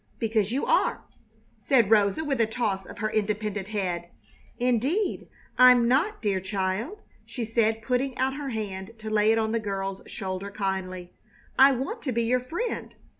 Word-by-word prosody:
"Because 220 -2 0
you 270 +3 0
are!" - - +2 0.6
said 235 -7 +3
Rosa, 210 +7 +3
with 270 -5 0
a 225 - +3
toss 210 -5 -2
of - - -10
her 215 0 -2
independent 210 -2 -1
head. 180 -5 -3 0.5
"Indeed 255 - 0 0.3
I'm 250 -2 +7
not, 320 - +1
dear 200 -3 +1
child," 190 - -3 0.2
she 240 -3 -5
said, 225 0 +1
putting 250 +2 -1
out 260 +1 +1
her 285 0 -5
hand 210 -2 -5
to 220 0 -7
lay 215 0 +4
it 225 - +3
on 220 -1 0
the 230 - +1
girl's 195 -2 -4
shoulder 190 -2 -5
kindly. 190 -3 -4 0.5
"I 270 +1 +8
want 260 +2 -4
to 265 - -2
be 235 0 0
your 250 +2 +2
friend." 335 - -4
220 Hz, 170 wpm, -26 LUFS, 200-250 Hz, 0.6 s, I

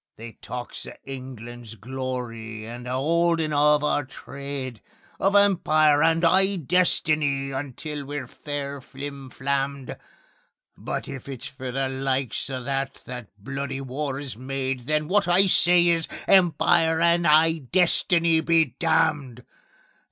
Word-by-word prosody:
They 115 +1 -9
talks 125 0 -7
o' - - -8
England's 120 -4 -9
glory 115 -2 -5
and 120 +2 -8
a 125 - -2
'oldin' 165 +2 +1
of 150 0 +4
our 145 0 +1
trade, 135 -2 -7 0.4
Of 195 +1 +2
Empire 155 -7 +4
and 165 +1 +3
'igh 190 +3 +4
destiny 150 -5 +1
until 145 +2 -5
we're 145 -1 -5
fair 140 +1 -6
flim 135 +1 -8
flammed; 140 0 -2 0.8
But - - -5
if 135 0 -8
it's 130 -3 -6
for 130 -2 -6
the 135 +1 -1
likes 130 -1 -2
o' 130 -2 -4
that 135 +1 -3
that 125 -3 -7
bloody 135 +5 -5
war 135 +1 -4
is 140 -5 -6
made, 130 0 -4
Then 155 0 0
wot 200 +2 +2
I 180 +3 +5
say 175 -2 +4
is: 165 -1 +1 0.2
Empire 170 -3 +4
and 170 0 +3
'igh 155 -2 +4
destiny 170 -2 +3
be 160 -6 +2
damned! 150 -7 +1
140 Hz, 135 wpm, -24 LUFS, 130-160 Hz, 0.8 s, I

